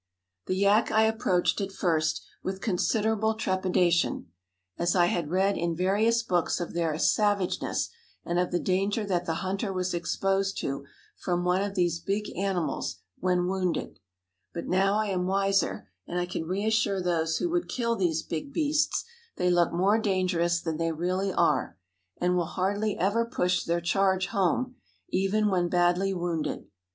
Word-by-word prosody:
The 185 - 0
yak 200 +3 +3
I 220 - +4
approached 220 -4 +1
at 195 0 -3
first 160 -5 0 0.2
with 190 0 -4
considerable 220 +2 +1
trepidation, 180 - +1 0.5
as 170 +1 +1
I 175 -2 +5
had 170 -3 -1
read 190 +3 +1
in 170 -1 -1
various 210 +6 +2
books 180 -6 0
of 175 - -4
their 165 -3 0
savageness 205 +1 +1 0.4
and 175 +1 0
of 180 - +1
the 175 - 0
danger 195 +4 0
that 180 -3 -1
the 165 - 0
hunter 195 +2 -2
was 185 -1 -2
exposed 195 +3 0
to 140 0 -4 0.3
from 175 -1 -1
one 180 +1 +2
of 200 0 -3
these 175 -3 +1
big 200 +4 -3
animals 175 - -1 0.2
when 180 -1 +1
wounded; 185 - -2 0.6
but 170 - -4
now 195 +2 +2
I 215 0 +1
am 180 -2 -1
wiser, 195 - +1 0.2
and 175 - -4
I 175 - 0
can 175 -2 -4
reassure 200 +1 +1
those 165 -3 0
who 345 - -1
would 350 0 -1
kill 235 -2 0
these 165 -6 0
big 165 - -5
beasts; 305 0 +1 0.3
they 180 - +1
look 175 -1 +3
more 195 +6 +3
dangerous 185 -4 +1
than 160 -2 -3
they 165 0 0
really 185 +4 -1
are, - - +1 0.4
and 180 0 +2
will 175 -1 +1
hardly 200 +5 -1
ever 205 +6 +2
push 180 -6 0
their 170 +1 0
charge 190 +1 +2
home, 230 +5 0 0.3
even 195 +3 +1
when 175 -2 +1
badly 175 +2 +2
wounded. 175 -4 -2
185 Hz, 165 wpm, -27 LUFS, 175-200 Hz, 0.6 s, I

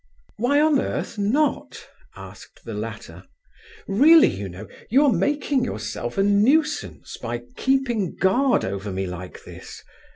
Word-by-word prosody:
"Why 250 +6 +2
on 300 -2 +3
earth 230 - -4
not?" 270 +9 -1 0.3
asked - - -13
the - - -6
latter. - - -7 0.6
"Really, 300 +11 +6
you 100 0 -6
know, 90 +5 -10 0.2
you 275 +6 +4
are 270 - +4
making 285 -2 0
yourself - - -5
a 195 - +3
nuisance, 265 +10 +1
by 120 0 -5
keeping 255 -8 0
guard 245 +7 +2
over 100 +1 -4
me 95 +1 -3
like 90 0 -8
this. - - -12
230 Hz, 135 wpm, -23 LUFS, -, 0.6 s, Really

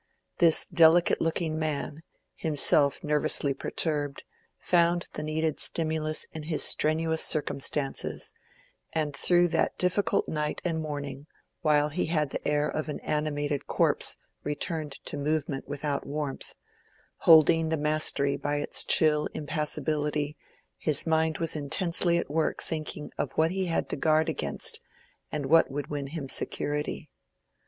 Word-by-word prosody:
This 165 -2 +5
delicate 170 +1 +4
looking 160 -1 -1
man, 155 0 -3 0.3
himself 145 -2 +2
nervously 150 -1 +1
perturbed, 145 -1 -2 0.3
found 175 0 +2
the - - -4
needed 155 0 -2
stimulus 155 -1 0
in 160 - -6
his 155 0 +1
strenuous 160 +1 +3
circumstances, 145 -2 0 0.6
and 150 -3 -1
through 175 +2 +4
that - - 0
difficult 180 +3 +1
night 150 -1 -2
and 165 -2 -1
morning, 145 -2 -6 0.3
while 150 -2 +3
he 150 - -2
had 155 -4 0
the - - -4
air 150 0 +1
of 155 +1 -3
an 150 - -4
animated 145 -1 -2
corpse - - +2 0.3
returned 150 0 -3
to - - -5
movement 145 -1 -2
without 145 0 -3
warmth, 145 -1 -4 0.6
holding 165 0 +5
the 160 - 0
mastery 150 -2 +1
by 145 0 -2
its 145 - 0
chill 150 -1 +3
impassibility, 150 -1 -1 0.4
his 150 -3 +3
mind 160 -1 +1
was 165 -1 -2
intensely 170 +3 +1
at - - -2
work 155 +2 -1
thinking 155 -2 -5
of - - -2
what 160 +1 +2
he 190 0 -2
had 165 - -1
to - - -2
guard 155 +2 +2
against - - -1 0.5
and 150 -2 -3
what 165 +4 +4
would 145 +2 -5
win 145 -2 -3
him 145 -1 -6
security. 145 +2 -2
155 Hz, 135 wpm, -28 LUFS, 145-160 Hz, 0.6 s, This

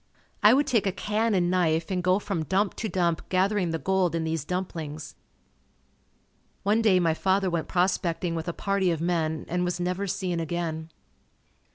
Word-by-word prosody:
I 215 +4 +7
would 290 +2 +3
take 225 -5 +1
a - - +2
can 215 +3 0
and 175 -1 +2
knife 165 -2 +1
and 185 -1 0
go 185 +1 +3
from 165 -5 -3
dump 195 +4 +1
to 220 - -3
dump 170 -3 -1
gathering 190 0 +1
the 165 - -1
gold 185 -1 +1
in 165 - -1
these 160 -2 -2
dumplings. 160 -3 -5 1.5
One 210 +3 +2
day 200 -5 +4
my 165 -2 +2
father 190 +2 +1
went 170 -2 -2
prospecting 180 -1 0
with 165 0 -4
a - - 0
party 195 +1 0
of 165 -2 0
men 160 -2 -1
and 180 +1 -1
was 180 0 -2
never 180 +3 -1
seen 180 -2 -2
again. 165 -1 -3
180 Hz, 180 wpm, -26 LUFS, 165-195 Hz, 1.5 s, I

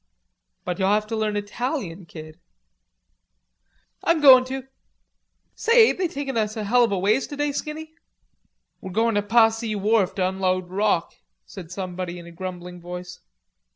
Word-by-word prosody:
"But 180 +1 -3
you'll 190 0 +2
have 210 +1 +2
to 225 +1 -4
learn 215 -1 -1
Italian, 205 - -4
Kid." 155 -1 -11 1.6
"I'm 335 -1 +2
goin' 265 -4 +8
to. 265 +1 -5 0.9
Say, 460 0 +5
ain't - - -3
they 370 - +1
taking 275 -4 -5
us 215 0 -1
a 215 - -3
hell 240 +4 +4
of 230 - -4
a 200 - 0
ways 210 +8 +1
today, 290 0 -2
Skinny?" 310 +2 -6 0.9
"We're 190 - -7
goin' 225 +2 +2
to 205 - +2
Passy 225 +1 +2
Wharf 205 -1 +1
to 185 -2 +1
unload 185 -1 -1
rock," 195 -3 0 0.3
said 175 -4 -10
somebody 180 -1 -5
in 170 - -10
a 170 - -11
grumbling 180 0 -7
voice. 180 +1 -8
205 Hz, 155 wpm, -23 LUFS, 185-245 Hz, 1.6 s, goin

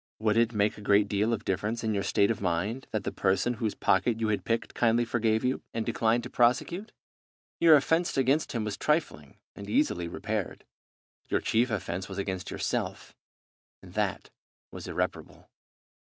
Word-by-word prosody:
Would 110 -1 +1
it 115 0 +3
make 105 -1 0
a - - -10
great 100 0 +3
deal 105 +3 +1
of 115 - -2
difference 105 +5 -2
in 110 -1 0
your 100 - 0
state 100 +1 +2
of 110 - -4
mind 100 +8 -1
that 110 -2 -2
the - - -3
person 95 +5 +1
whose 110 -2 -1
pocket 110 +4 +2
you 110 -1 0
had 105 - 0
picked 115 0 -1
kindly 120 0 +2
forgave 110 -1 +1
you, 130 +1 0
and 115 -1 -1
declined 115 +2 +1
to - - -6
prosecute? 170 - +1 0.7
Your 165 -2 +8
offence 165 +4 +1
against 135 +4 +2
him 115 -3 -1
was 105 -1 -3
trifling, 150 - -1 0.2
and 100 0 -9
easily 90 - +1
repaired. 105 +3 -4 0.6
Your - - +1
chief 120 +3 +1
offence 95 -3 -3
was 95 - -7
against 95 -2 -3
yourself, - - -3 0.7
and - - -13
that - - -2 0.4
was - - -8
irreparable. - - -4
110 Hz, 175 wpm, -28 LUFS, 100-120 Hz, 0.7 s, Your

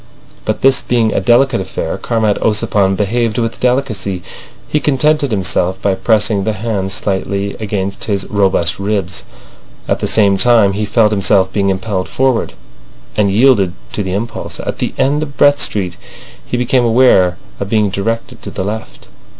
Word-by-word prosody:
But - - -2
this 135 0 +4
being 115 -3 +1
a - - +1
delicate 120 +3 +3
affair, - - -4
Comrade 110 -3 0
Ossipon 105 -3 +1
behaved 110 +2 -1
with 115 -1 -2
delicacy. 110 -8 -1 0.4
He 150 - 0
contented 150 0 +1
himself 95 -3 0
by 100 - +1
pressing 105 +1 +1
the 110 - -1
hand 105 -3 -3
slightly 100 0 -2
against 100 -2 -3
his 100 -2 -2
robust 95 -4 +1
ribs. 100 -2 -2 0.7
At - - 0
the - - -1
same 100 -3 +3
time 115 -4 +4
he 105 +2 -2
felt 105 +1 +2
himself 100 -2 +2
being 100 -2 +1
impelled 95 0 -2
forward, 130 -3 0 0.6
and 105 -2 +2
yielded 105 -4 +3 0.2
to - - -2
the 95 -2 -3
impulse. 115 +3 -5
At - - -5
the - - -3
end 140 +3 +1
of 145 -2 -6
Brett 145 0 +4
Street 90 -4 -1 0.5
he 125 - -3
became 125 +1 +1
aware 115 -7 +4 0.2
of 100 - -4
being 105 -2 +1
directed 115 +4 -3
to - - -6
the - - -4
left. 110 +3 -6
105 Hz, 165 wpm, -15 LUFS, 95-120 Hz, 0.7 s, this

